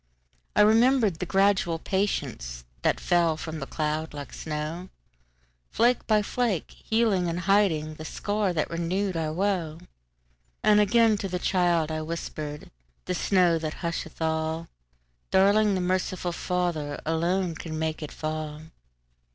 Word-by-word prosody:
I - - +6
remembered 220 -3 +4
the 180 - -3
gradual 195 -3 +2
patienceThat - - -2
fell 170 -3 +2
from 160 0 -5
that 135 - -6
cloud 155 0 -2
like 145 -2 -7
snow, 155 +4 -5 0.8
Flake 240 +1 +2
by 215 -1 +3
flake, 225 -5 -1
healing 220 -5 +1
and 170 +1 -2
hidingThe 160 -6 +1
scar 205 +1 -1
that 160 -2 -1
renewed 180 +3 -1
our 160 -2 -1
woe. 175 -3 -1 0.9
And 210 0 +5
again 220 +1 +4
to 195 - -2
the 180 - -1
child 175 -4 +1
I 155 0 -2
whispered,"The 150 - -6
snow 180 -2 +3
that 155 -1 -5
husheth 165 -1 -4
all, 160 +1 -1 0.6
Darling, 200 +2 +4
the 185 - 0
merciful 185 0 -1
FatherAlone 170 +1 -1
can 155 -2 -5
make 160 0 -2
it 150 - -6
fall!" 155 -1 -4
170 Hz, 125 wpm, -27 LUFS, 155-195 Hz, 0.9 s, I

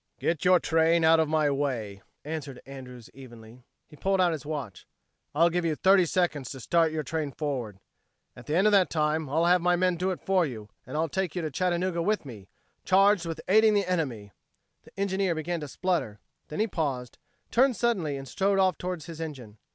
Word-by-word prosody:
"Get 165 -3 -1
your 180 0 +5
train 165 +1 +2
out 160 0 +5
of 160 -2 +1
my 155 -2 +2
way," 120 -8 -3 0.2
answered, 145 -4 -6
Andrews 125 -3 -10
evenly. 120 -2 -13 0.3
He - - -15
pulled 195 +5 0
out 180 -2 +4
his 150 -3 -5
watch. 135 - -6 0.5
"I'll 170 +3 +4
give 175 +1 0
you 160 -2 0
thirty 190 +1 +4
seconds 155 -7 -1
to 135 - -7
start 165 +5 +2
your 155 -1 -3
train 155 -2 -3
forward. 130 -9 -4 0.6
At 120 - -13
the 150 - -1
end 190 +4 +3
of 215 - +5
that 195 -3 +4
time 155 -1 0
I'll 160 +4 +1
have 180 0 +4
my 180 +1 +3
men 180 0 +1
do 185 +2 -1
it 185 - -3
for 190 -2 +3
you, 110 -8 -6 0.2
and 130 - -5
I'll 160 +1 +1
take 185 +1 -3
you 175 - -2
to 155 - -3
Chattanooga 175 +2 0
with 210 0 0
me 105 -7 -10 0.4
charged 195 -2 +3
with 165 -1 -5
aiding 215 +2 +5
the 200 - +2
enemy!" 130 - -2 0.5
The - - -16
engineer 195 -2 0
began 170 +2 -3
to 150 - -6
splutter; 140 - -2 0.3
then 150 - -6
he 215 - +3
paused, 140 - -3 0.3
turned 255 +1 +3
suddenly 185 -10 0
and 135 0 -8
strode 195 +7 0
off 185 -3 +2
toward 180 -3 -4
his 165 -2 -9
engine. 125 -10 -8
160 Hz, 205 wpm, -27 LUFS, 140-185 Hz, 0.6 s, your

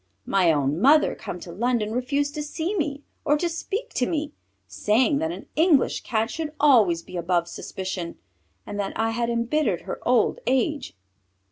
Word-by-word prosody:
My 185 -4 +3
own 145 +2 0
mother, 300 +5 +5
come 180 - -7
to 170 - -8
London, 220 +2 0
refused 280 +4 -1
to 300 - -3
see 320 +6 -3
me 290 -5 -2 0.2
or 295 0 +3
to 345 - 0
speak 400 +8 -4
to 250 - +1
me, 305 -2 -2 0.3
saying 255 +7 +2
that 320 +1 -1
an - - -8
English 315 -4 +3
Cat 225 0 -1
should 315 -2 -4
always 215 - +5
be 180 - -8
above 170 0 0
suspicion, 185 -1 -5 0.5
and 205 - -6
that 195 -1 -2
I 225 0 +1
had 235 +1 -1
embittered 235 +6 0
her - - -6
old - - +2
age. 265 - 0
250 Hz, 170 wpm, -25 LUFS, 195-300 Hz, 0.5 s, mother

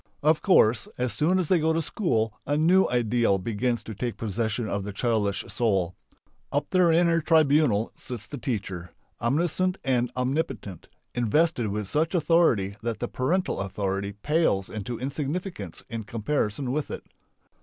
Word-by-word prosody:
Of 155 +1 +3
course 120 - +4
as 125 -3 -1
soon 155 - +2
as 185 -4 0
they 180 0 +3
go 160 +1 +2
to 165 - +1
school 115 - 0
a 145 +1 +1
new 180 +5 +4
ideal 120 -4 +2
begins 115 +4 -1
to 110 - -7
take 120 +3 -4
possession 110 +1 -2
of 100 -1 -2
the 105 - -5
childish 105 -2 0
soul. 100 -5 0 0.6
Up 145 - 0
there 180 -3 +4
in 170 +2 +4
her 165 -1 +3
tribunal 150 -8 +3
sits 125 -5 -7
the 145 - -7
teacher, 95 -8 -4 0.3
omniscient 175 +9 +1
and 125 -2 +1
omnipotent, 125 - -2 0.3
invested 125 +2 +2
with 105 0 -3
such 160 - 0
authority 150 - +3
that 115 -1 -2
the 120 - -2
parental 170 +12 0
authority 100 0 -2
pales 105 - +1
into 110 +2 -5
insignificance 140 - -4
in 115 -1 -5
comparison 115 +2 -2
with 150 +2 -2
it. - - -6
120 Hz, 155 wpm, -26 LUFS, 105-155 Hz, 0.6 s, course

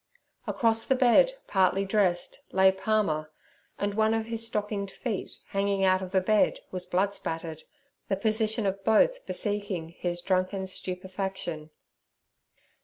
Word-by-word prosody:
Across 225 -3 +2
the 265 - +2
bed, 260 - +5
partly 190 0 +2
dressed, 190 -3 0
lay 190 0 +5
Palmer, 190 -6 0 0.5
and 200 0 -1
one 220 +1 +2
of 225 -1 -1
his 230 0 -1
stockinged 210 -2 -2
feet 210 0 -5
hanging 200 0 0
out 185 0 +4
of 185 - -5
the 190 0 +2
bed 210 +2 +3
was 180 -1 -4
blood 195 +3 +1
spattered—the 165 +3 -6
position 220 +1 +1
of 195 0 -2
both - - +3
bespeaking 200 -5 -1
his 175 0 -4
drunken 185 +1 0
stupefaction. 185 -3 -5
195 Hz, 130 wpm, -28 LUFS, 185-215 Hz, 0.5 s, bed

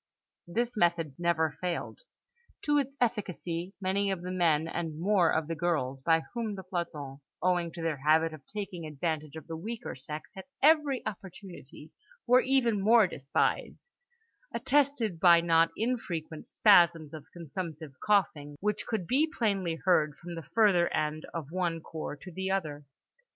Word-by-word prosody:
This 235 +7 -1
method 170 -6 +1
never 160 -3 0
failed. 180 -1 -3 0.6
To 295 -1 +3
its 275 0 -3
efficacy 190 -6 -2
many 200 +1 0
of 190 -3 -3
the 180 - -4
men 165 -4 +2
and 165 -2 -4
more 180 -2 +3
of 160 -1 0
the 165 - -2
girls 150 -5 -1
(by 165 +3 +3
whom 230 -4 -3
the 190 - -8
plantons, 155 -7 -5 0.2
owing 175 -2 +1
to 170 - -6
their 160 -3 -1
habit 155 +3 +3
of 155 - -10
taking 195 -5 -6
advantage 155 0 -3
of 160 - -8
the 165 - -6
weaker 225 +8 -6
sex 150 +4 -7
at 190 - -9 0.2
every 300 -3 +4
opportunity, 185 -7 -9 0.3
were 250 +1 +6
even 245 -6 +2
more 220 +2 +6
despised) 150 - -2 0.6
attested 255 - +1
by 170 -1 +7
not 165 -1 +4
infrequent 175 -10 -3
spasms 170 -7 +4
of 155 -2 -9
consumptive 160 -2 -7
coughing, 155 -8 +1
which 210 +1 -2
could 220 -6 -2
be 290 - +2
plainly 195 -7 0
heard 155 -5 +3
from 175 0 -8
the 165 -4 -8
further 195 -6 +4
end 155 0 -1
of 160 -3 -6
one 175 -2 -1
cour 155 -2 -6
to 185 - -10
the 190 +2 -3
other. 155 -7 -2
175 Hz, 155 wpm, -29 LUFS, 160-205 Hz, 0.6 s, by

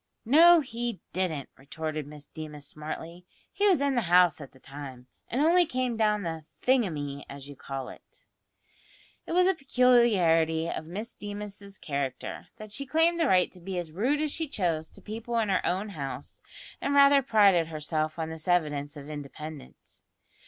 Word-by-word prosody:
"No, 330 +7 +7
he 235 -4 -4
didn't," 165 -7 -2
retorted 155 +2 -5
Miss 150 -1 -10
Deemas 150 -2 -8
smartly; 160 +3 -7 0.3
"he 410 +1 +2
was 360 -8 +4
in 280 -1 +2
the 245 - +2
house 175 -2 +5
at 140 - -10
the 130 - -20
time, 135 -2 -9 0.2
and 245 - -1
only 345 +4 +5
came 255 -5 -1
down 210 -2 +1
the 160 -2 -4 0.2
`thingumy,' 155 - 0
as 140 0 -9
you 145 - -10
call 135 -1 -6
it!" - - -15 1.0
It - - -3
was 360 +1 +5
a 380 - +4
peculiarity 205 - +3
of 160 -1 -4
Miss 210 +7 -5
Deemas's 205 -1 -7
character, 140 -3 -4
that 215 -2 -10
she 275 +6 -4
claimed 325 +4 +3
the 325 - +3
right 185 -6 +3
to 185 - -13
be 185 +1 -5
as 170 -3 -4
rude 255 - 0
as 305 -1 -1
she 320 +1 -3
chose 170 - -2
to - - -16
people 230 +2 -4
in 220 -3 +1
her 190 - +1
own 190 +4 -1
house, 140 -7 -6 0.4
and 280 - 0
rather 280 0 +7
prided 200 -9 +4
herself 155 0 -2
on 160 -1 -3
this 160 +1 -7
evidence 150 -4 0
of 145 0 -9
independence. 150 0 -9
180 Hz, 175 wpm, -28 LUFS, 155-240 Hz, 1.0 s, No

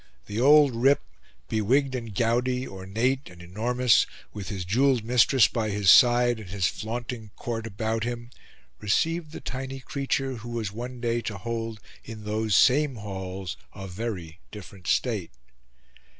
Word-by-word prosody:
The 105 - -4
old 145 -1 +6
rip, 135 +5 +3 0.4
bewigged 130 - +1
and 115 -5 -5
gouty, 125 +3 +1
ornate 110 +8 -2
and 90 -1 -14
enormous, 115 +7 +2 0.3
with 100 -3 -6
his 95 -3 -4
jewelled 125 +4 +2
mistress 120 0 +5
by 110 -3 -2
his 100 -2 +4
side 120 -2 +6
and 105 -5 -10
his 95 -1 -1
flaunting 115 +1 -4
court 115 -1 -4
about 110 +2 -2
him, 120 0 -5 0.5
received 160 +9 0
the - - -8
tiny 135 +1 -5
creature 135 -1 -2
who 115 +1 -9
was 115 -4 -3
one 120 +3 -7
day 120 -1 0
to 105 -3 -5
hold 115 +1 -4 0.2
in 110 -2 -9
those 105 -1 0
same 140 +4 +4
halls 95 -3 -6 0.2
a 95 -2 -7
very 90 -4 -5
different 95 -2 -11
state. 110 -9 0
115 Hz, 150 wpm, -26 LUFS, 105-125 Hz, 0.5 s, old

